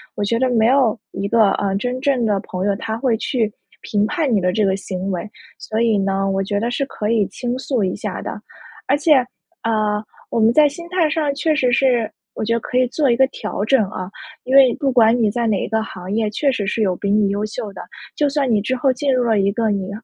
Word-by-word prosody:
我 205 - -2
觉 230 +3 0
得 260 0 +2
没 225 -2 +3
有 250 -3 +3
一 200 - -3
个， 215 -1 +4
呃， 195 -1 -1
真 250 +4 -3
正 265 -4 +1
的 205 -2 +1
朋 185 -2 -4
友， 200 -1 +1
他 220 +2 -4
会 235 -2 +1
去 225 -2 -1 0.3
评 205 -1 0
判 280 +3 0
你 210 - +3
的 180 -1 0
这 215 - +1
个 190 -1 +2
行 190 -1 -5
为， 185 +3 -4 0.3
所 220 +1 -3
以 225 -3 +3
呢， 195 0 0
我 195 0 0
觉 200 +1 -1
得 230 +3 -1
是 275 +3 -1
可 215 -5 -4
以 220 -3 +2
倾 245 0 -4
诉 260 -4 -1
一 185 -1 -1
下 205 -3 -5
的。 - - -6 0.5
而 275 - +3
且， 305 +1 +4 0.5
呃， 215 -2 0 0.3
我 - - -1
们 225 +1 +4
在 300 +1 +5
心 340 +4 -9
态 350 -3 +1
上 300 -2 0
确 305 +2 0
实 255 -4 +2
是 245 -3 +2 0.3
我 - - -3
觉 230 - +1
得 230 - +1
可 250 - -3
以 255 - +4
做 285 +2 0
一 235 - +4
个 265 - +5
调 210 -5 -4
整 250 0 +3
啊。 185 -3 -6 0.3
因 260 +2 -1
为 260 -3 +7
不 275 -2 +1
管 235 -2 +4
你 215 -3 +2
在 235 +1 -1
哪 210 -3 +1
一 - - -3
个 220 -1 0
行 185 -3 -7
业 220 0 0
确 275 +7 0
实 210 -7 -2
是 220 - -1
有 185 -3 +1
比 200 - -3
你 205 0 +3
优 200 +1 -1
秀 210 -1 -6
的。 - - -8 0.3
就 295 -1 +1
算 275 -2 0
你 210 -2 +2
之 260 +5 -1
后 260 +1 +2
进 275 +2 -1
入 250 -1 +2
了 225 -3 +2
一 195 0 +2
个 225 +1 0
你 195 -2 -2
225 Hz, 275 characters per minute, -20 LUFS, 205-260 Hz, 0.5 s, 为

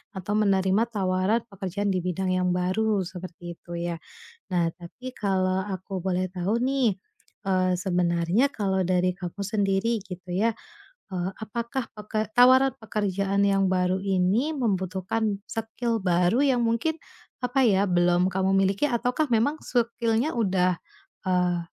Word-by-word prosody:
atau 190 +2 -3
menerima 195 +1 +3
tawaran 195 +1 0
pekerjaan 195 +1 -2
di 185 - 0
bidang 185 +1 -2
yang 180 0 +1
baru, 195 +2 +1
seperti 175 -1 -8
itu 175 - -8
ya. 170 -1 -3 0.5
Nah, 175 -2 +2
tapi 250 +9 -10
kalau 190 -1 0
aku 190 -1 -5
boleh 185 -1 0
tahu 190 +5 -1
nih, 250 -6 +1 0.5
eee, 185 -1 +2
sebenarnya 180 +6 +1
kalau 195 -7 0
dari 180 0 +1
kamu 180 +1 -7
sendiri, 205 +2 0
gitu 180 -2 -9
ya, 220 +4 +1 0.6
eee, 180 0 -2
apakah 235 +3 -4
peke 215 0 -4
tawaran 255 +3 +6
pekerjaan 200 -2 0
yang 195 -1 +3
baru 185 0 +1
ini, 195 +10 +1
membutuhkan 200 -1 -1
skill 225 +1 -2
baru 180 +5 +2
yang 250 -3 +2
mungkin, 230 +8 +1 0.5
apa 255 +2 +2
ya 195 -1 +3
belum 175 0 +3
kamu 190 +1 +1
miliki 195 +6 +2
ataukah 250 +4 0
memang 280 +8 +2
skill-nya 235 +3 0
udah, 185 -5 +1 0.5
eee, 180 -1 +2
195 Hz, 135 wpm, -26 LUFS, 185-225 Hz, 0.6 s, tawaran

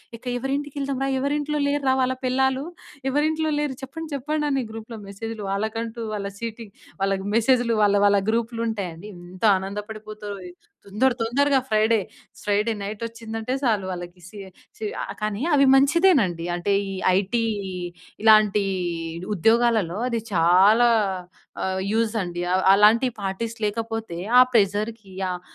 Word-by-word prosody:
ఇక 230 - -15
ఎవరింటికి 275 +3 -3
ఎళ్దాం 275 -1 -2
రా? 270 - 0
ఎవరింట్లో 295 +2 -1
లేరురా 285 -2 +1
వాళ్ళ 255 0 +1
పెళ్ళాలు? 265 +1 +1 0.5
ఎవరింట్లో 310 +3 +1
లేరు 295 -3 -1
చెప్పండి? 320 +4 -7
చెప్పండి? 300 +3 -2
అని 270 -2 0
గ్రూప్‌లో 225 +1 -8
మెసేజ్లు 220 +2 -6
వాళ్ళకంటూ, 225 +3 -3
వాళ్ళ 200 -1 -3
సీటింగ్. 230 -2 -7 0.3
వాళ్ళకి 195 0 0
మెసేజ్లు 235 0 +3
వాళ్ళ 205 0 +4
వాళ్ళ 200 0 +5
గ్రూప్లు 230 +1 -1
ఉంటాయండి. 200 -4 -5
ఎంత 175 +2 -12
ఆనందపడిపోతరో. 210 +1 -7 0.5
తొందర 225 +7 +1
తొందరగా 275 +4 +2
ఫ్రైడే, 220 +1 +3 0.4
ఫ్రైడే 210 +2 +1
నైట్ 205 +2 -6
ఒచ్చిందంటే 225 +1 -5
సాలు 215 -6 +1
వాళ్ళకి 175 0 -8
సి 210 +2 -12 0.4
సి 220 - -5 0.2
ఆహ్, - - -5
కానీ 215 +1 -2
అవి 280 -1 +5
మంచిదేనండి. 275 - +3
అంటే 175 +3 0 0.2
ఈ - - -4 0.2
ఐటీ 205 +4 0 0.8
ఇలాంటి 215 -2 +5 0.7
ఉద్యోగాలలో 225 -2 +2
అది 230 -2 -1
చాలా 190 +8 +5 0.7
ఆహ్, 190 0 -1
యూజ్ 225 0 +1
అండి. 175 0 -4
ఆహ్, 185 - +2
అలాంటి 220 +5 +5
పార్టీస్ 225 +4 -3
లేకపోతే 225 -4 -3 0.2
ఆ - - +10
ప్రెజర్‌కి 210 -1 0 0.2
ఆహ్, 180 0 -5
225 Hz, 135 wpm, -24 LUFS, 200-255 Hz, 0.8 s, ఆ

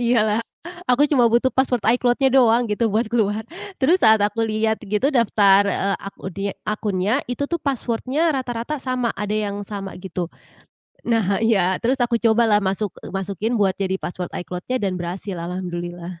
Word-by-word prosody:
Iya 240 0 +3
lah, 215 +2 +1 0.5
aku 285 +4 +4
cuma 245 -6 +4
butuh 240 +3 +3
password 255 -3 +1
iCloud-nya 245 +2 +2
doang 240 -2 +5
gitu 220 +1 0
buat 220 +3 +1
keluar. 220 -2 0 0.3
Terus 335 +7 +3
saat 220 0 +7
aku 225 +2 -2
lihat 220 0 0
gitu 210 +5 0
daftar, 205 -4 +5
eee, 195 +1 0
akun 195 -1 -7
de 195 - -5 0.2
akunnya, 210 -1 0 0.2
itu 285 +3 -2
tuh 340 +3 -2
password-nya 275 +4 0
rata-rata 245 +1 -3
sama, 255 -3 -1
ada 210 0 -3
yang 205 -1 -2
sama 195 -1 -6
gitu. 180 -2 -4 0.8
Nah 220 -4 +1
iya, 190 -5 +3
terus 260 +3 +1
aku 240 - -1
cobalah 225 -2 +4
masuk 195 0 -2 0.2
masukin 200 +4 -2
buat 195 -2 +2
jadi 190 -1 -1
password 180 0 -5
iCloud-nya 180 +8 -4
dan 195 -5 -1
berhasil. 180 +3 -5
Alhamdulillah. 175 0 -5
215 Hz, 165 wpm, -22 LUFS, 195-240 Hz, 0.8 s, saat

